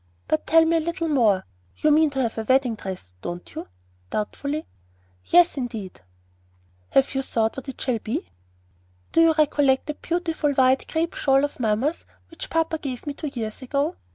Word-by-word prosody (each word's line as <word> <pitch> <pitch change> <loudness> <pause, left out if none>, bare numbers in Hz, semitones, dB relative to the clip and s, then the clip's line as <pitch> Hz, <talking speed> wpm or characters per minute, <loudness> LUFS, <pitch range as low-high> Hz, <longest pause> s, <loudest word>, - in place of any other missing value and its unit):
"But 310 - 0
tell 325 0 +6
me 330 +1 +3
a - - +3
little 335 +1 -2
more. 220 -10 +3 0.3
You 305 - +3
mean 310 +1 +5
to 270 -2 -2
have 230 - -2
a - - -2
wedding 260 +1 +3
dress, 190 - -7
don't 175 0 -6
you?" - - -6 0.4
doubtfully. 280 - -3 0.6
"Yes, 350 -2 +5
indeed!" 225 - -5 0.9
"Have 270 +1 +3
you 270 - 0
thought 225 -4 0
what 270 +1 -7
it 270 - -8
shall 245 -4 0
be?" 215 - -4 0.8
"Do 330 - +4
you 330 -1 +6
recollect 290 -3 +3
that 300 0 -6
beautiful 330 -4 -1
white 260 0 +3
crape 330 +1 -1
shawl 270 0 +3
of 290 - -8
mamma's 235 +8 0 0.2
which 330 - -8
papa 325 -1 0
gave 260 -5 -5
me 290 - -3
two 300 - -5
years 230 -5 -5
ago? 280 +6 -1
275 Hz, 180 wpm, -24 LUFS, 235-315 Hz, 0.9 s, tell